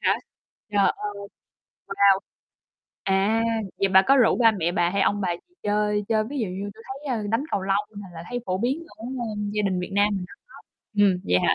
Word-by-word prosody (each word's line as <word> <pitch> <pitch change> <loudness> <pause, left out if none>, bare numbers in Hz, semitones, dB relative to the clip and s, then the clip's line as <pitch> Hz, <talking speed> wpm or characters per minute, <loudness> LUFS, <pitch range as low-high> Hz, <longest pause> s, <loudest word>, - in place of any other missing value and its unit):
hả? - - +3 0.6
Trời 205 - +2 0.2
ơi, 200 -1 -6 0.6
wow! 195 -1 +5 0.9
À, 200 +4 +2 0.4
vậy 195 - +3
bà 190 0 +6
có 275 +7 +4
rủ 245 -4 +5
ba 230 -2 +6
mẹ 175 -3 -1
bà 175 -2 +2
hay 200 +1 +1
ông 205 +1 +1
bà 180 -3 0
gì 355 - -11
chơi 210 0 +1
chơi 215 -1 +2
ví 290 - -3
dụ 220 - 0
như 195 +3 -5
tui 225 - -14
thấy, 265 -1 -4
ơ, 215 - -3
đánh 230 +6 +1
cầu 195 - 0
lông, 200 +2 -1
nà, 200 - -9
là 165 - -7
thấy 245 - -1
phổ 185 0 -1
biến 270 +9 -1
ở, 220 - -10 0.3
ơm, 205 -1 -3
gia 210 - +1
đình 190 -3 0
Việt 180 - -5
Nam 205 +1 +4
mình 180 - -4
rất - - -12
tốt. - - -15 0.4
Ừm, 185 -3 +4
vậy 90 0 +3
hả? - - +4
205 Hz, 230 wpm, -25 LUFS, 195-220 Hz, 0.9 s, bà